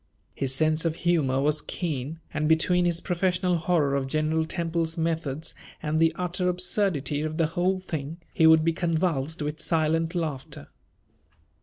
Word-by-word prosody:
His 135 Hz, -1 st, 0 dB
sense 155 Hz, +2 st, +2 dB
of 165 Hz, -2 st, 0 dB
humor 160 Hz, -7 st, +1 dB
was 150 Hz, +1 st, +1 dB
keen, 155 Hz, -2 st, -4 dB
and, 155 Hz, 0 st, 0 dB
between 175 Hz, +2 st, +3 dB
his 170 Hz, -1 st, +1 dB
professional 180 Hz, 0 st, 0 dB
horror 160 Hz, -4 st, +1 dB
of 140 Hz, -1 st, 0 dB
General 155 Hz, +2 st, 0 dB
Temple's 165 Hz, -1 st, -2 dB
methods 160 Hz, -2 st, -2 dB, 0.3 s
and 155 Hz, 0 st, 0 dB
the 165 Hz, 0 st, +4 dB
utter 180 Hz, +1 st, -1 dB
absurdity 180 Hz, -5 st, 0 dB
of 155 Hz, 0 st, -3 dB
the 165 Hz, -, +3 dB
whole 180 Hz, +4 st, 0 dB
thing, 160 Hz, -3 st, -5 dB, 0.2 s
he 160 Hz, -, +5 dB
would 160 Hz, 0 st, +6 dB
be 165 Hz, -, +2 dB
convulsed 160 Hz, -3 st, -1 dB
with 150 Hz, +1 st, -4 dB
silent 165 Hz, +1 st, +1 dB
laughter. 150 Hz, -6 st, -4 dB
160 Hz, 155 wpm, -26 LUFS, 155-175 Hz, 0.3 s, would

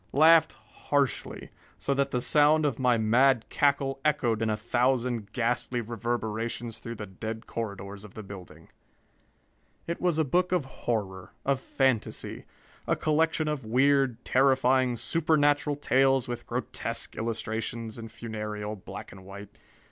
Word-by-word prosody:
Laughed 160 Hz, +2 st, +6 dB
harshly, 140 Hz, -3 st, -2 dB, 0.3 s
so 140 Hz, -, -1 dB
that 140 Hz, 0 st, +1 dB
the 125 Hz, -, -1 dB
sound 150 Hz, +3 st, +4 dB
of 135 Hz, -4 st, -1 dB
my 125 Hz, -2 st, +3 dB
mad 120 Hz, +3 st, +3 dB
cackle 140 Hz, -2 st, +1 dB
echoed 125 Hz, -7 st, +1 dB
in 110 Hz, -, +1 dB
a 105 Hz, -, 0 dB
thousand 120 Hz, -1 st, 0 dB
ghastly 120 Hz, +1 st, -1 dB
reverberations 115 Hz, 0 st, -3 dB
through 115 Hz, 0 st, -7 dB
the 105 Hz, -, -6 dB
dead 110 Hz, +4 st, -6 dB
corridors 100 Hz, -3 st, -6 dB
of 105 Hz, -, -13 dB
the 110 Hz, -, -7 dB
building. 90 Hz, -5 st, -11 dB, 1.2 s
It 170 Hz, -, -4 dB
was 175 Hz, -3 st, +2 dB
a 160 Hz, -, +2 dB
book 180 Hz, +7 st, +1 dB
of 180 Hz, -6 st, +1 dB
horror, 100 Hz, -8 st, -4 dB
of 140 Hz, -1 st, +2 dB
fantasy. 130 Hz, -4 st, -1 dB, 0.4 s
A -, -, +2 dB
collection 155 Hz, 0 st, +1 dB
of 150 Hz, -3 st, -2 dB
weird, 130 Hz, +1 st, +2 dB
terrifying, 130 Hz, -1 st, +3 dB
supernatural 150 Hz, -1 st, +2 dB
tales 135 Hz, -2 st, +2 dB
with 120 Hz, -1 st, -5 dB
grotesque -, -, -2 dB
illustrations 115 Hz, 0 st, -3 dB
in 115 Hz, -, -7 dB
funereal 105 Hz, -2 st, -5 dB
black 95 Hz, -, -9 dB
and 95 Hz, -, -12 dB
white. 100 Hz, +2 st, -11 dB
120 Hz, 140 wpm, -28 LUFS, 110-140 Hz, 1.2 s, Laughed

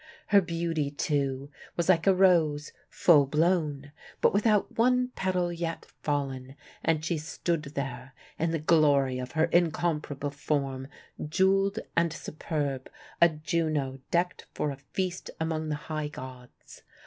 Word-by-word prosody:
Her 200 Hz, -2 st, +6 dB
beauty, 165 Hz, -4 st, -1 dB
too, 140 Hz, -2 st, -1 dB, 0.3 s
was 170 Hz, -, 0 dB
like 180 Hz, -1 st, +3 dB
a 195 Hz, -, +6 dB
rose, 165 Hz, -6 st, +3 dB, 0.2 s
full 150 Hz, -6 st, +5 dB
blown, 150 Hz, -2 st, +1 dB, 0.3 s
but -, -, +3 dB
without 210 Hz, 0 st, +2 dB
one 250 Hz, +2 st, +3 dB
petal 185 Hz, -6 st, -1 dB
yet 165 Hz, -1 st, -4 dB, 0.2 s
fallen: 135 Hz, -3 st, -2 dB, 0.3 s
and 155 Hz, -1 st, +1 dB
she 160 Hz, -1 st, 0 dB
stood 165 Hz, +1 st, -2 dB
there, 130 Hz, -1 st, -5 dB, 0.2 s
in 165 Hz, -, +1 dB
the 165 Hz, -, 0 dB
glory 145 Hz, -5 st, +3 dB
of 125 Hz, 0 st, -6 dB
her 160 Hz, +1 st, +3 dB
incomparable 160 Hz, -4 st, 0 dB
form, 140 Hz, -2 st, -2 dB, 0.4 s
jeweled 195 Hz, +5 st, +2 dB, 0.2 s
and 170 Hz, 0 st, +3 dB
superb, 145 Hz, -5 st, -4 dB, 0.3 s
a 170 Hz, -, +8 dB
Juno 155 Hz, -4 st, -1 dB
decked 175 Hz, +1 st, 0 dB
for 150 Hz, -, -1 dB
a 135 Hz, -, -7 dB
feast 180 Hz, +6 st, -4 dB
among 160 Hz, -1 st, -2 dB
the 150 Hz, -, 0 dB
high 155 Hz, -1 st, -2 dB
gods. 130 Hz, -3 st, -11 dB
155 Hz, 135 wpm, -28 LUFS, 140-175 Hz, 0.4 s, a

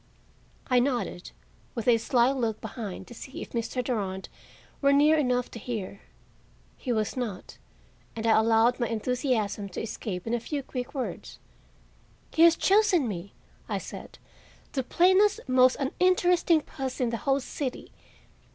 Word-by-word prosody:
I 250 Hz, -1 st, +3 dB
nodded, 245 Hz, -8 st, -1 dB, 0.5 s
with 230 Hz, -1 st, -4 dB
a 235 Hz, -2 st, +5 dB
sly 240 Hz, +2 st, +3 dB
look 230 Hz, -5 st, -1 dB
behind 200 Hz, -5 st, -6 dB
to 240 Hz, -, -12 dB
see 260 Hz, +3 st, -8 dB
if -, -, -12 dB
Mr. 240 Hz, +2 st, -2 dB
Durand 195 Hz, -6 st, -3 dB, 0.5 s
were 280 Hz, -1 st, +4 dB
near 295 Hz, +3 st, +5 dB
enough 250 Hz, -4 st, 0 dB
to 230 Hz, -, -8 dB
hear. 205 Hz, -4 st, -5 dB, 0.7 s
He 250 Hz, -, -4 dB
was 215 Hz, -2 st, -1 dB
not, 230 Hz, -8 st, -5 dB, 0.6 s
and 225 Hz, 0 st, -4 dB
I 225 Hz, -, +5 dB
allowed 225 Hz, +2 st, +3 dB
my 240 Hz, -, +1 dB
enthusiasm 225 Hz, -3 st, -1 dB
to 180 Hz, -, -5 dB
escape 205 Hz, -4 st, -5 dB
in 230 Hz, -, -2 dB
a 240 Hz, -, +1 dB
few 280 Hz, +4 st, -4 dB
quick 250 Hz, +1 st, -6 dB
words. 260 Hz, -, -5 dB, 0.9 s
"He 320 Hz, -, 0 dB
has 335 Hz, 0 st, +8 dB
chosen 390 Hz, -, +3 dB
me," 195 Hz, -1 st, -6 dB, 0.4 s
I -, -, 0 dB
said, -, -, -9 dB, 0.5 s
"the 270 Hz, -, -1 dB
plainest, 375 Hz, +9 st, +4 dB
most 255 Hz, 0 st, +4 dB
uninteresting 355 Hz, +2 st, +3 dB
puss 265 Hz, -3 st, -6 dB
in 245 Hz, -3 st, +1 dB
the 230 Hz, -, -1 dB
whole 275 Hz, +2 st, +1 dB
city." 260 Hz, 0 st, -5 dB
250 Hz, 150 wpm, -27 LUFS, 225-280 Hz, 0.9 s, has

